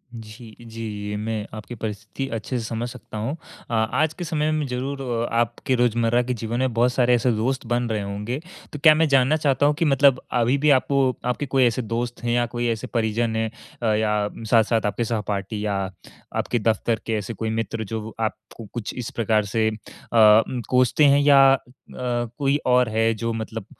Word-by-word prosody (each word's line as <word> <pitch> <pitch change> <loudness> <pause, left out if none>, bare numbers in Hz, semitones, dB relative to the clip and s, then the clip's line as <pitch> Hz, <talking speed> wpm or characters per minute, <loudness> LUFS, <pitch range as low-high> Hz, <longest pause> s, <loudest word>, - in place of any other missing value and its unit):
जी, 110 0 -11
जी, 110 -3 -6
मैं 110 -1 -3
आपकी 110 +3 -8
परिस्थिति 110 +4 -5
अच्छे 115 +3 -3
से 120 - -3
समझ 115 +1 -3
सकता 120 -3 -10
हूँ। 115 +9 -2 0.3
अ, 115 - -5
आज 115 +8 +1
के 180 - -4
समय 155 -1 0
में 155 -1 0
ज़रूर 135 +3 -4 0.3
आपके 120 +2 0
रोज़मर्रा 120 0 +2
के 125 - -2
जीवन 115 +1 -3
में 130 -2 0
बहुत 120 +2 +2
सारे 125 -1 +3
ऐसे 120 +1 +1
दोस्त 125 +4 -1
बन 120 0 0
रहे 110 -2 -1
होंगे। 105 +6 -4 0.3
तो 150 - -5
क्या 155 -2 +9
मैं 160 +1 +3
जानना 135 +1 +4
चाहता 145 -2 +2
हूँ 150 - +4
कि 165 - +2
मतलब 135 -2 +4
अभी 120 +2 +2
भी 150 +2 +2
आप - - -18 0.4
आपके 125 +4 -1
कोई 135 -1 +2
ऐसे 120 +1 +1
दोस्त 120 +2 -4
हैं 120 - 0
या 120 0 +2
कोई 120 0 -3
ऐसे 115 +2 -3
परिजन 115 0 0
हैं 110 0 0 0.3
अ, 115 - +1
या 105 -1 0 0.2
साथ-साथ 115 -1 +3
आपके 105 +3 -1
सहपाठी 105 -1 -3
या 100 -1 0 0.6
आपके 120 - 0
दफ़्तर 115 +1 0
के 115 - -2
ऐसे 105 +2 -4
कोई 110 +1 -3
मित्र, 115 0 -2
जो 110 +1 -4
व - - -13
आपको 110 +1 -5
कुछ 120 -3 -4
इस 125 -3 -4
प्रकार 110 -2 +1
से 110 +2 0
अम, 110 +2 +2
कोसते 130 +5 +3
हैं 140 0 +5
या 145 -1 +6
अ, - - +3 0.4
कोई 125 +3 -1
और 125 -1 +3
है, 115 +1 +2
जो 115 +1 -3
मतलब 110 -1 -5
115 Hz, 195 wpm, -23 LUFS, 110-125 Hz, 0.6 s, क्या